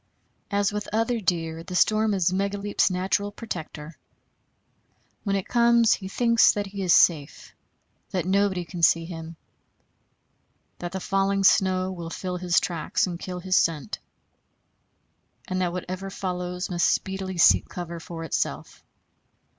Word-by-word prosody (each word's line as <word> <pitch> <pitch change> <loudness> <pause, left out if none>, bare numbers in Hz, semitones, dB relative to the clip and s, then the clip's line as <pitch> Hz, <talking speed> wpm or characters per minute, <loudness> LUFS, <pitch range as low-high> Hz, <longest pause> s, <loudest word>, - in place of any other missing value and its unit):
As 200 -1 +1
with 210 -1 -4
other 225 +2 0
deer, 165 -4 -1
the 180 - -7
storm 215 +2 +3
is 185 -1 +1
Megaleep's 200 +2 0
natural 190 +2 -1
protector. 165 -7 -7 1.2
When 200 -2 0
it 195 - -2
comes 235 -1 +4
he 190 - -5
thinks 230 +3 +4
that 205 -1 -2
he 195 0 -7
is 185 -2 +1
safe; 165 -5 +3 0.6
that 185 -3 -2
nobody 190 -1 +1
can 175 0 -7
see 165 0 +4
him; 165 -1 -8 1.4
that 175 0 -5
the 190 - -4
falling 195 +1 0
snow 185 -1 +3
will 170 -3 -6
fill 180 +1 -4
his 180 -1 +2
tracks 170 -3 -1
and 175 -2 -5
kill 180 -1 -6
his 185 +1 0
scent; 165 +3 0 1.5
and 185 0 -2
that 180 -1 0
whatever 185 +2 -5
follows 180 -1 -4
must 175 -1 +2
speedily 190 -1 -2
seek 170 - +5
cover 170 -1 -6
for 165 0 -8
itself. 165 - -3
185 Hz, 140 wpm, -25 LUFS, 175-200 Hz, 1.5 s, seek